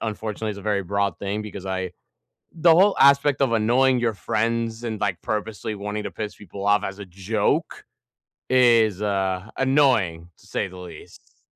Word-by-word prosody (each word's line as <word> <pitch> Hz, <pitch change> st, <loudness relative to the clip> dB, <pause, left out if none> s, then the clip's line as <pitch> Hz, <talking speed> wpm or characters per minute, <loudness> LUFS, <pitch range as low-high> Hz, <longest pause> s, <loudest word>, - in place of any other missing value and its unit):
unfortunately 110 Hz, 0 st, -4 dB
is 100 Hz, -, -7 dB
a 100 Hz, -, -10 dB
very 105 Hz, -2 st, 0 dB
broad 100 Hz, -1 st, -1 dB
thing 100 Hz, +2 st, -3 dB
because 100 Hz, -2 st, -8 dB
I 95 Hz, -1 st, -3 dB, 0.6 s
the 165 Hz, 0 st, +5 dB
whole 195 Hz, +4 st, +5 dB
aspect 140 Hz, 0 st, +4 dB
of 130 Hz, -4 st, +2 dB
annoying 125 Hz, +3 st, +3 dB
your 120 Hz, -2 st, 0 dB
friends 115 Hz, +2 st, -2 dB
and, 110 Hz, -3 st, -4 dB
like, 95 Hz, -4 st, -1 dB
purposely 110 Hz, 0 st, -3 dB
wanting 105 Hz, +1 st, -5 dB
to -, -, -5 dB
piss 105 Hz, -1 st, -6 dB
people 100 Hz, 0 st, -9 dB
off 105 Hz, -1 st, +3 dB
as 95 Hz, +1 st, -5 dB
a 100 Hz, -, -7 dB
joke 100 Hz, +4 st, -2 dB, 0.7 s
is, 115 Hz, -6 st, +4 dB
uh, 95 Hz, -1 st, -1 dB
annoying 125 Hz, -, +2 dB
to -, -, -22 dB
say -, -, -2 dB
the 95 Hz, -1 st, -12 dB
least. 85 Hz, -4 st, -13 dB
105 Hz, 170 wpm, -23 LUFS, 100-115 Hz, 0.7 s, the